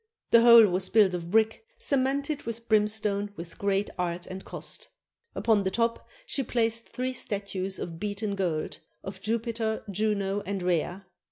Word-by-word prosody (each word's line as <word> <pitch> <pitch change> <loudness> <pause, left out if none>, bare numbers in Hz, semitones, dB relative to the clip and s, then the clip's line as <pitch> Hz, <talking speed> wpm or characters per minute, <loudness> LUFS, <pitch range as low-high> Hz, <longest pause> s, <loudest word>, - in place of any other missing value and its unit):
The 230 - +7
whole 235 -1 +9
was 185 -1 0
built 210 -4 +4
of 170 -1 -4
brick, 220 - +2
cemented 280 - 0
with 230 0 -6
brimstone 210 -1 +1
with 170 -1 -8
great 200 0 0
art 175 0 -2
and 190 +1 -7
cost. - - -7 0.5
Upon 220 -3 +2
the 190 - 0
top 230 +3 -1 0.2
she 285 - -2
placed 230 -2 0
three 255 +1 -3
statues 200 -4 -2
of 165 -1 -6
beaten 205 0 -2
gold, 175 -6 -2 0.2
of 195 - -8
Jupiter, 225 0 -2
Juno, 200 0 0
and 195 -1 -3
Rhea. 180 +2 -1
210 Hz, 155 wpm, -28 LUFS, 190-230 Hz, 0.5 s, whole